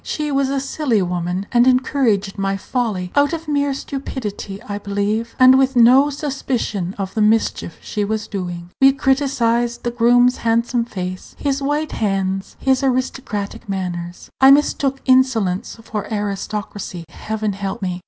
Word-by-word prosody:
She 300 -1 -3
was 275 -1 +1
a 275 0 0
silly 265 -6 0
woman, 180 +1 -2
and 240 +1 +4
encouraged 250 -6 +2
my 195 0 -1
folly; 195 -5 -2
out 285 +2 +3
of 325 -1 -5
mere 285 -1 +1
stupidity, 250 -8 -5
I 205 -4 -5
believe, 205 +3 -2
and 255 +1 +7
with 265 0 +2
no 255 +4 +6
suspicion 260 - -3
of 195 -1 -4
the 220 - 0
mischief 215 -5 +1
she 210 - -3
was 215 +1 -2
doing. 175 -3 -6
We 270 0 +7
criticised 255 -4 +1
the 240 - -1
groom's 245 +1 +4
handsome 235 +1 +1
face, 185 -4 -6
his 280 -1 -1
white 295 +3 -1
hands, 195 -2 -2
his 265 0 +2
aristocratic 250 -6 -2
manners. 180 -2 -5
I 265 - +8
mistook 275 -1 +3
insolence 245 -9 +2
for 210 -1 -5
aristocracy; 205 -3 -4
Heaven 215 +4 -3
help 195 0 -5
me! 180 -1 -2
230 Hz, 150 wpm, -19 LUFS, 195-265 Hz, -, I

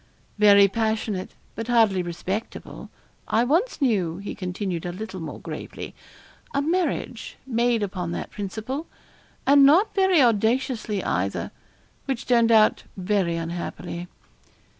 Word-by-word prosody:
'Very 200 -1 +7
passionate, 220 -2 -2 0.2
but 225 +1 -5
hardly 225 -6 +3
respectable. 180 +5 -5 0.4
I 225 - +2
once 335 - +1
knew,' 195 - +1
he 200 +1 -6
continued 180 -2 -4
a 175 - -3
little 190 +1 -7
more 160 -3 -7
gravely, - - -7 0.6
'a 280 - +2
marriage 315 -7 -2
made 235 -3 +1
upon 185 -4 -3
that - - -5
principle, 220 - -5 0.6
and 280 0 +6
not 330 +10 +5
very 380 -3 +4
audaciously 230 -2 +1
either, 95 +3 -2 0.5
which 265 -4 -3
turned 235 -2 +3
out 220 -1 +5 0.2
very 185 -2 0
unhappily.' 170 +1 -5
215 Hz, 120 wpm, -24 LUFS, 185-245 Hz, 0.6 s, Very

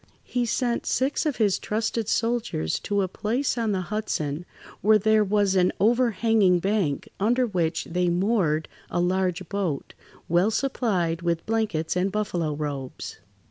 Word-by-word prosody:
He 245 -1 -1
sent 240 +1 -1
six 275 +4 +1
of 290 - 0
his 205 -4 +2
trusted 220 0 -2
soldiers 230 - 0
to 200 -1 0
a - - 0
place 230 +9 -1
on 230 -3 0
the 190 -2 0
Hudson, 175 -6 -3 0.3
where 215 +3 +6
there 215 +1 +3
was 205 -1 +2
an 180 -1 +4
overhanging 225 -4 +3
bank 190 -6 0
under 240 +5 +2
which 170 -7 -1
they 180 +1 0
moored 175 -4 +1 0.2
a - - -1
large 185 0 0
boat, 190 -7 -3 0.3
well 175 +5 +3
supplied 210 -10 0
with 170 -1 -1
blankets 215 -9 -1
and 185 +2 +1
buffalo 175 -7 -1
robes. 145 -3 -5
195 Hz, 145 wpm, -25 LUFS, 175-225 Hz, 0.3 s, where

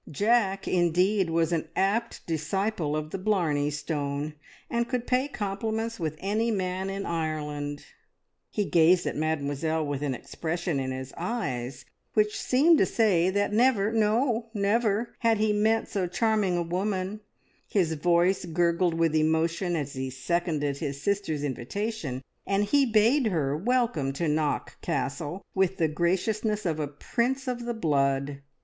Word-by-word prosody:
Jack, 200 +3 +1
indeed, 180 +2 +2
was 165 0 +1
an 165 -2 -1
apt 225 +5 0
disciple 165 0 -1
of 155 0 -3
the 195 - -3
Blarney 170 -8 +1
Stone, 145 0 -3 0.3
and 235 0 0
could 250 -2 -1
pay 255 +2 +1
compliments 220 0 -3
with 155 -2 -2
any 215 +6 0
man 190 -2 -1
in 195 0 -4
Ireland. 150 -3 -3 0.6
He 210 - -1
gazed 175 +1 +4
at - - -2
Mademoiselle 155 +1 -1
with 145 -1 -3
an 140 -3 -1
expression 170 +2 -3
in 130 -1 -2
his 130 0 -5
eyes 130 - -3 0.3
which 210 -1 +3
seemed 305 +6 +4
to - - +5
say 185 -6 +3
that 205 +2 0
never, 220 -3 +3
no, 225 +2 +1
never, 215 +2 +1
had 230 -2 +3
he 215 0 +2
met 220 +2 +2
so 190 -3 -1
charming 205 -1 +1
a 175 - 0
woman; 190 +3 -2 0.5
his 175 -6 +1
voice 175 +4 +2
gurgled 170 0 +1
with 165 -1 +2
emotion 160 +3 +1
as 145 -3 -3
he 130 0 -3
seconded 145 +1 -1
his 140 0 -4
sister's 180 -4 -1
invitation, 140 - -3 0.2
and 200 +1 +2
he 275 +5 +3
bade 230 +4 +4
her 150 -8 0
welcome 220 - 0
to 165 +4 -1
Knock 150 0 -1
Castle 145 +6 -3
with 190 -1 +1
the 165 - +2
graciousness 200 +6 0
of 160 -3 0
a 150 - -1
prince 245 - -2
of 240 -1 -3
the 240 - -1
blood. 140 -6 0
180 Hz, 150 wpm, -27 LUFS, 155-215 Hz, 0.6 s, to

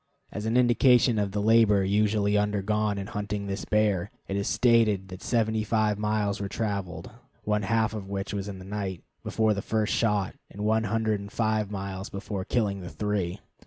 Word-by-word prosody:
As 105 +1 -4
an 115 +2 +2
indication 120 -2 +4
of 100 -1 -1
the 100 0 -1
labor 110 -3 +5
usually 105 +1 +2
undergone 105 0 0
in 100 - -4
hunting 105 0 -4
this 100 0 -4
bear, 105 -3 +1 0.2
it 100 - -3
is 100 0 -1
stated 110 -6 +3
that 90 0 -9
seventy 110 -2 +1
five 105 -1 +1
miles 105 -1 0
were 100 - -3
traveled 100 -6 -3 0.3
(one 105 0 +1
half 110 +1 +1
of 100 -3 -6
which 100 0 -3
was 100 -1 -3
in 100 -2 -6
the 95 - -10
night) 95 -3 -4 0.2
before 110 -1 +1
the 100 - -3
first 110 +1 0
shot, 105 -4 +1 0.2
and 105 +1 -5
one 110 +1 +2
hundred 110 0 0
and 100 0 -9
five 110 -2 0
miles 95 -1 -5
before 100 0 -5
killing 100 -3 -1
the 90 - -7
three. 100 -3 -2
105 Hz, 190 wpm, -27 LUFS, 100-110 Hz, 0.3 s, labor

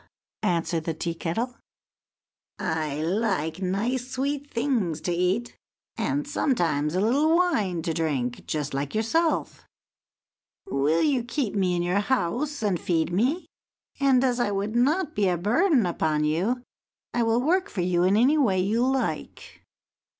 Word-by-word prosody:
answered 170 -2 0
the 165 - -2
Tea 170 +1 -3
kettle; 180 +10 -3 1.0
"I 155 -2 -2
like 185 -3 -1
nice 230 +7 -1
sweet 280 +2 -2
things 230 - 0
to 175 - -2
eat, 185 +7 0 0.4
and 285 0 -1
sometimes 175 - 0
a - - +2
little 280 +10 +3
wine 215 - +1
to 165 - -1
drink, 140 -7 -2
just 150 -2 -2
like 140 +4 -3
yourself. 315 +10 0 1.0
Will 145 +4 +1
you 270 -5 +2
keep 240 -2 -2
me 185 -3 +1
in 175 - 0
your 180 +3 +1
house 260 - -1
and 195 -5 +1
feed 165 0 0
me? 260 - +1 0.5
And, 270 -2 +4
as 250 -2 +1
I 240 - +1
would 205 +2 -2
not 305 +7 +2
be 205 -2 +1
a 175 - +1
burden 245 - +3
upon 155 -3 0
you, 190 +12 0 0.5
I 240 - +1
will 225 0 +2
work 360 +9 +1
for 185 - -3
you 175 0 +1
in 190 +3 +3
any 275 +7 +4
way 200 -10 +2
you 215 +6 +1
like." 265 0 -2
205 Hz, 150 wpm, -26 LUFS, 170-260 Hz, 1.0 s, And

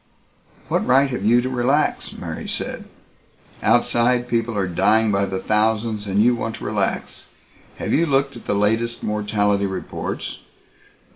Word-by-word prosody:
"What - - 0
right 135 +2 +5
have 125 - -3
you 120 +3 +4
to 130 - -3
relax," 130 +4 +1
Mary - - -6
said. - - -4 0.8
"Outside, 120 +1 +2
people 115 -2 -1
are 100 - +1
dying 105 +5 +2
by 100 0 +1
the 95 0 -3
thousands 110 +1 0
and 100 +2 +2
you 125 +1 +4
want 115 -2 -3
to - - -10
relax. - - -2 0.5
Have - - -3
you 165 +2 +3
looked 140 -1 +1
at 120 - -12
the - - +1
latest 115 +3 0
mortality 105 -1 0
reports?" 95 - -5
110 Hz, 150 wpm, -21 LUFS, 105-120 Hz, 0.8 s, right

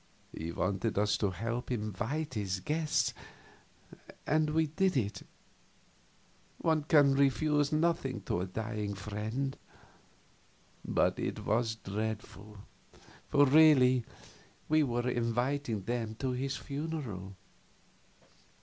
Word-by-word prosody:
He 80 +2 -4
wanted 100 +5 -1
us 105 +1 +3
to 100 - +1
help 115 +7 -4
him 115 -4 -1
invite 120 - -3
his 100 -4 -2
guests, 155 - 0 1.1
and 155 +1 +2
we 160 +1 +2
did 180 +2 +1
it 100 -5 -1 1.4
one 160 -2 +1
can 145 -3 +5
refuse 140 +2 +2
nothing 155 -7 0
to 90 - -2
a 95 - -3
dying 105 0 -4
friend. 110 +7 -3 1.3
But - - +1
it - - -3
was 110 +1 +1
dreadful, 105 -1 -5 0.7
for 145 0 +5
really 130 -4 +6 0.6
we 155 0 +4
were 120 -3 0
inviting 120 -1 -1
them 115 0 -3
to 130 +3 -2
his 135 +2 -2
funeral. 140 - -5
120 Hz, 110 wpm, -32 LUFS, 105-145 Hz, 1.4 s, really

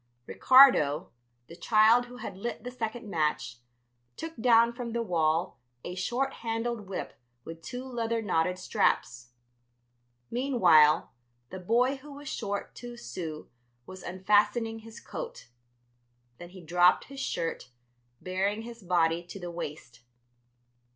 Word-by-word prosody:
Ricardo, 245 - +5 0.3
the 165 - -12
child 225 +5 +4
who 245 0 -11
had 200 - -7
lit 230 +5 -5
the 250 - -6
second 235 -1 -5
match, 150 -9 -1 0.6
took 325 0 -6
down 235 0 +4
from 235 -1 -6
the 235 0 -1
wall 165 -3 0 0.2
a 175 - -5
short 240 +9 -1
handled 225 -2 -3
whip 195 - -5 0.3
with 165 0 -9
two 245 +11 -6
leather 230 -3 -2
knotted 180 -4 0
straps. 120 -9 -1 1.0
Meanwhile, 185 - +4 0.4
the 190 - -6
boy 240 +8 +1
who 285 +2 -12
was 290 +1 -11
short 205 -6 -4
two 240 -1 -9
sous 155 - -6 0.4
was 185 0 -10
unfastening 210 +5 +1
his 225 0 -12
coat. - - -8 0.9
Then 175 - -10
he 185 0 -12
dropped 175 +2 +4
his 275 0 -11
shirt, 165 - -3 0.5
baring 195 +4 -2
his 235 0 -10
body 170 -2 +1
to 195 - -9
the 175 -1 -6
waist. 150 -8 -8
205 Hz, 130 wpm, -29 LUFS, 175-240 Hz, 1.0 s, Ricardo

